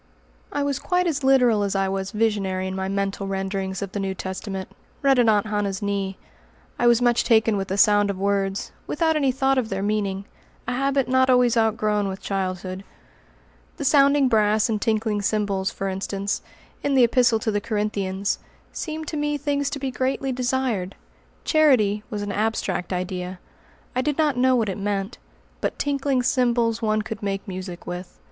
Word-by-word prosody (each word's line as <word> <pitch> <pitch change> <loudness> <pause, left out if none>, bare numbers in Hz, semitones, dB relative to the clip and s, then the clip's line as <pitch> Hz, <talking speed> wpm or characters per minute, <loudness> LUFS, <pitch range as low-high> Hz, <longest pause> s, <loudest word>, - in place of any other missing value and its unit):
I 285 - -1
was 280 -2 -1
quite 360 0 +1
as 300 -5 -1
literal 250 -5 +4
as 200 -1 -1
I 195 0 +1
was 190 0 -2
visionary 200 -4 0
in 190 0 -3
my 190 0 -2
mental 195 0 -2
renderings 195 0 -3
of 195 - -6
the 205 - -3
New 195 -1 -2
Testament, 190 +1 -5 0.4
read 270 -2 +4
at 235 -2 +5
Aunt 210 -1 +3
Hannah's 205 -2 -1
knee. 195 -1 -2 0.6
I - - +3
was 240 0 +4
much 240 -1 +3
taken 220 -2 +3
with 195 -1 -2
the 195 - -2
sound 205 0 +5
of 200 - -2
words, 195 0 -1 0.2
without 320 +1 +1
any 275 -3 +2
thought 270 +1 +2
of 230 -3 -3
their 195 0 -2
meaning 200 -2 -1 0.4
a - - -1
habit 275 0 +1
not 260 0 +3
always 250 -2 +4
outgrown 215 -2 +1
with 190 0 -4
childhood. 185 -1 -3 0.9
The 285 - -4
"sounding 280 0 +5
brass 215 -2 +3
and 215 -2 -1
tinkling 215 -2 0
cymbals," 200 -2 0
for 195 - -4
instance, 195 +1 -2 0.4
in 285 -1 0
the 260 - +6
Epistle 240 -1 +4
to 220 0 -1
the 205 0 -1
Corinthians, 200 -2 -1 0.3
seemed 315 -1 -5
to 310 - -3
me 295 0 0
things 285 0 -1
to 285 - -4
be 270 -1 -3
greatly 265 +1 -1
desired. 245 -6 -1 0.5
"Charity" 250 -10 +3
was 210 -4 -3
an 205 - -3
abstract 205 -4 -1
idea. 180 0 -3 0.6
I 255 - +2
did 295 +1 -1
not 305 -4 +2
know 255 +1 +3
what 230 -3 +1
it 190 - -4
meant. 200 +2 -2 0.4
But - - -2
"tinkling 280 -2 0
cymbals" 235 -2 +1
one 215 -1 +1
could 220 0 -6
make 195 -1 -3
music 185 -2 -6
with. 180 +1 -7
215 Hz, 180 wpm, -24 LUFS, 195-255 Hz, 0.9 s, the